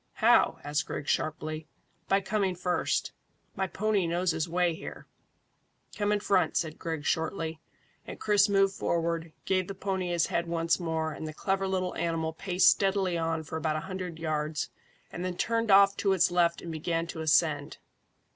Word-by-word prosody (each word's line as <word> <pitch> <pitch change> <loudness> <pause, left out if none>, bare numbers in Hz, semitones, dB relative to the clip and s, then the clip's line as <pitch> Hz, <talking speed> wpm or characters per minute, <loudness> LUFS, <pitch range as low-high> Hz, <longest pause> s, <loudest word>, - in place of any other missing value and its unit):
"How?" - - +4
asked 145 +1 -1
Griggs 145 - -2
sharply. 155 0 -2 0.4
"By 195 +1 +3
coming 195 -2 0
first. 180 0 -1 0.4
My 190 0 -1
pony 205 -1 0
knows 175 +2 +1
his 160 +1 -2
way 175 0 +2
here." 160 - -8 0.9
"Come 205 0 0
in 210 - +2
front," 190 -5 +2
said 160 -2 -2
Griggs 160 -3 -4
shortly, 160 -1 -1 0.5
and - - -8
Chris 205 -1 +3
moved 195 -1 +3
forward, 165 -2 -1
gave 185 -1 +1
the 195 - -6
pony 190 -2 -2
his 170 -1 +2
head 170 0 -1
once 165 0 +1
more, 160 -2 -1
and 155 - -6
the 155 - -7
clever 195 +2 0
little 185 -1 -1
animal 165 -1 -1
paced 185 +1 +4
steadily 195 -2 +1
on 165 -1 -1
for 160 +1 -5
about 155 -1 -1
a 155 - -2
hundred 185 -3 -6
yards, 155 +1 -2 0.4
and 175 - -5
then 180 -1 -3
turned 230 -1 0
off 195 0 +7
to 195 -2 +2
its 180 -2 +3
left 170 -1 +2
and 170 - -5
began 165 +1 -1
to 165 -1 -6
ascend. 155 -2 +2
170 Hz, 175 wpm, -29 LUFS, 160-190 Hz, 0.9 s, off